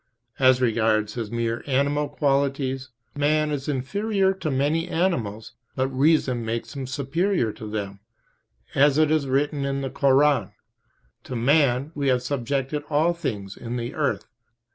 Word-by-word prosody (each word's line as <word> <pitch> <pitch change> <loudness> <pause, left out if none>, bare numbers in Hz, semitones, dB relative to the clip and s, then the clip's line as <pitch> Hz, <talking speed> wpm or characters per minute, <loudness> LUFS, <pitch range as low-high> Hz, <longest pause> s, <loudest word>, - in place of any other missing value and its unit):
As 130 -1 +5
regards 110 -3 +1
his 115 -3 -4
mere 115 0 -2
animal 145 +2 +1
qualities, 135 -2 0 0.2
man 150 +1 +1
is 145 -1 -3
inferior 195 - 0
to 180 -4 -4
many 150 +5 0
animals, 120 - -1 0.2
but 130 0 0
reason 135 -3 +2
makes 115 +4 -4
him 135 -2 -4
superior 140 - 0
to 110 - -8
them, 100 -2 -4 0.7
as 145 +1 +4
it 155 -1 +3
is 155 -3 +1
written 140 +2 0
in 140 0 -1
the 135 -1 -4
Koran: 135 -6 +3 0.7
"To 130 - -5
man 135 +2 +2
We 145 -2 -2
have 125 -1 +2
subjected 140 +2 -2
all 155 +3 +2
things 100 - -5
in 120 +1 -5
the 120 0 -4
earth." - - -1
135 Hz, 145 wpm, -24 LUFS, 120-150 Hz, 0.7 s, As